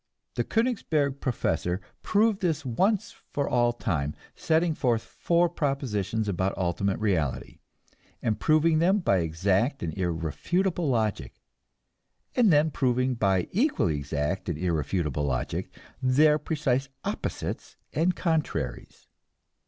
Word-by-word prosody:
The - - 0
Koenigsberg 160 - 0
professor 95 -7 -1 0.2
proved 215 -1 +2
this 160 -5 0
once 190 - +1 0.2
for 140 -1 -1
all 120 -1 +3
time, 75 -11 -2 0.2
setting 165 +1 +2
forth 120 -6 0
four 170 0 +1
propositions 115 - -1
about 95 0 -1
ultimate 95 +2 0
reality, 90 -11 -1 0.6
and 110 -2 -1
proving 155 +1 +3
them 185 +5 +4
by 170 - +2
exact 95 - 0
and 80 - -3
irrefutable 95 - -1
logic, 110 -5 -1 1.0
and 230 -6 +5
then 155 +1 +4
proving 130 -1 +1
by 95 -6 +1
equally 195 - +1
exact 75 +6 -2
and 85 - -2
irrefutable 75 -3 -1
logic 65 -3 -2 0.3
their 150 +4 +4
precise 140 -3 -1 0.2
opposites - - -4 0.2
and 170 +4 +2
contraries. 145 - -2
120 Hz, 115 wpm, -27 LUFS, -, 1.0 s, and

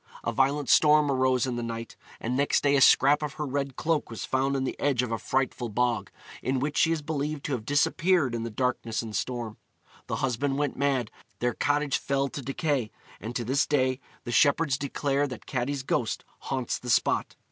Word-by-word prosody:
A - - -1
violent 140 +1 +1
storm 150 -1 +5
arose 130 -1 +2
in 125 -2 -3
the - - -2
night, 115 -1 -5 0.2
and 120 +2 -2
next 140 +2 +2
day 140 0 +4
a 135 - +3
scrap 145 +3 +6
of 150 -1 -3
her 150 - -4
red 140 -1 -2
cloak 160 -2 0
was 115 - -5
found 135 +1 0
on 135 - 0
the 130 - -2
edge 135 -4 +1
of 125 - -4
a 115 - -1
frightful 130 0 -1
bog, 120 +1 0 0.3
in 130 +1 0
which 145 +3 -2
she 165 - +3
is 160 -2 -1
believed 150 -1 -3
to - - -4
have 120 -5 -3
disappeared 155 0 +2
in 115 - -2
the 115 - -3
darkness 115 -1 -1
and 110 -2 -6
storm. 120 -4 -3 0.5
The - - -2
husband 135 +2 -1
went 145 0 -1
mad; 135 -5 0 0.3
their 120 0 0
cottage 145 -1 +1
fell 140 0 0
to 140 - -6
decay; 135 -3 -1 0.3
and 115 +3 -6
to 120 - -2
this 135 +5 +1
day 130 -3 +1 0.2
the 120 - -5
shepherds 140 +5 +3
declare 140 +1 -1
that 125 -4 -8
Catti's 130 +1 -2
ghost 115 -3 -1
haunts 130 -3 -3
the 125 - -7
spot. - - +1
135 Hz, 205 wpm, -27 LUFS, 120-145 Hz, 0.5 s, scrap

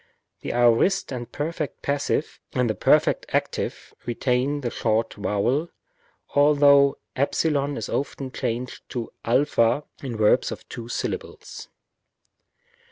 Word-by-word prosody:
The - - -4
aorist 120 +12 +3
and 120 -2 -5
perfect 155 0 -4
passive 145 +2 -1
and 125 -1 +1
the 110 - +1
perfect 100 - +3
active - - -2
retain 125 +4 0
the 120 -3 -2
short 110 0 0
vowel, 115 +10 0 0.6
although 145 -1 +5 0.2
ε 140 +2 +2 0.5
is 110 - -4
often 135 -1 -3
changed 125 -1 -4
to 120 -2 -4
a 125 +5 +3 0.6
in 125 -5 -5
verbs 105 -1 +3
of - - -8
two 115 -1 -7
syllables. - - -5
125 Hz, 115 wpm, -24 LUFS, 115-145 Hz, 0.6 s, although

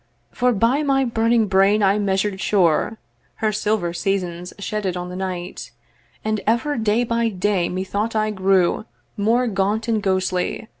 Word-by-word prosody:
For 250 0 +1
by 235 +6 +2
my 270 -2 +2
burning 230 -1 +2
brain 195 +2 +3
I 195 +2 +3
measured 195 0 0
sure 190 +2 +2 0.4
Her 215 -1 0
silver 205 -4 -1
seasons 180 -1 -2
shedded 200 -2 -3
on 180 0 -5
the 180 - -7
night, 185 -1 -5 0.6
And 215 -1 0
ever 245 +7 +1
day 220 +1 +1
by 230 -1 0
day 190 -2 0
methought 200 +5 -2
I 215 0 +1
grew 190 0 +2 0.3
More 230 +4 +2
gaunt 210 +1 0
and 225 -2 +1
ghostly. 185 +1 -1
205 Hz, 150 wpm, -21 LUFS, 190-225 Hz, 0.6 s, brain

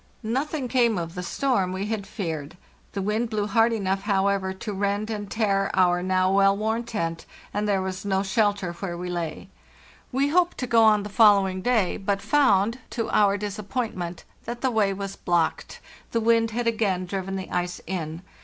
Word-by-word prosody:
Nothing 265 +4 -2
came 235 -4 +2
of 165 -1 -4
the 180 - -4
storm 195 -1 0
we 190 +2 -3
had 210 -2 -3
feared. 160 -7 -5 0.4
The 195 - -2
wind 215 +4 0
blew 210 -2 -1
hard 225 +3 +3
enough, 195 -3 -1
however, 195 -1 +1
to 205 +3 -6
rend 200 +2 -1
and 205 -2 -4
tear 200 -3 +1
our 180 -1 +3
now 185 0 +2
well 195 0 +4
worn 220 +2 -1
tent, 165 -7 -3 0.3
and 210 +1 -1
there 195 -2 +1
was 190 0 -4
no. 195 -1 0
shelter 200 -3 +1
where 175 0 -5
we 180 +1 -5
lay. 170 -3 -4 0.6
We 275 +2 +1
hoped 350 +2 +2
to 255 - -2
go 230 -2 +4
on 215 - +7
on 210 -1 0
the 205 - -6
following 200 -3 +4
day, 220 -5 +1
but 195 0 -1
found, 230 -4 +3
to 230 -2 -3
our 205 -1 +4
disappointment, 205 -3 -4 0.2
that 240 +1 -5
the 260 - +1
way 215 -4 +2
was 195 0 -5
blocked; 170 -3 -1 0.3
the 230 - +2
wind 230 0 +3
had 235 +2 -2
again 210 -5 0
driven 195 +1 -4
the 190 -1 -6
ice 180 0 -2
in. 165 -2 -4
200 Hz, 190 wpm, -25 LUFS, 185-225 Hz, 0.6 s, on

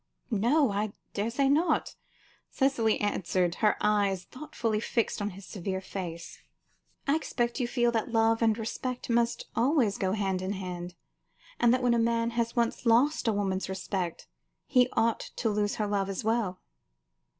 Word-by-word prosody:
"No, 240 +5 +3
I 205 +1 -1 0.2
daresay 230 +7 0
not," 305 +6 +2 0.5
Cicely 260 -5 +1
answered, 185 -3 0
her 210 -1 +3
eyes 200 -3 +2
thoughtfully 245 - -3
fixed 225 -1 -1
on 205 - -1
his 195 0 -11
severe 190 -1 -4
face. 175 -3 -7 0.7
"I 280 - +4
expect 240 -6 -1
you 245 - 0
feel 240 -1 +2
that 230 +1 -1
love 225 0 +3
and 225 -1 +3
respect 245 +2 -4
must 235 0 +1
always 245 -4 +2
go 190 -1 0
hand 195 -3 -1
in 190 +2 -2
hand, 180 -2 -6 0.6
and 240 -1 +5
that 255 +1 +2
when 245 -1 +4
a 235 - +2
man 230 0 +1
has 235 0 -1
once 235 0 0
lost 250 +4 +3
a - - +4
woman's 190 -3 -1
respect, 190 -2 -3 0.4
he 250 -2 +4
ought 230 0 +2 0.2
to 225 - 0
lose 205 0 0
her 215 - -1
love 200 -1 0
as 195 - -3
well." 220 -4 0
225 Hz, 160 wpm, -29 LUFS, 195-240 Hz, 0.7 s, and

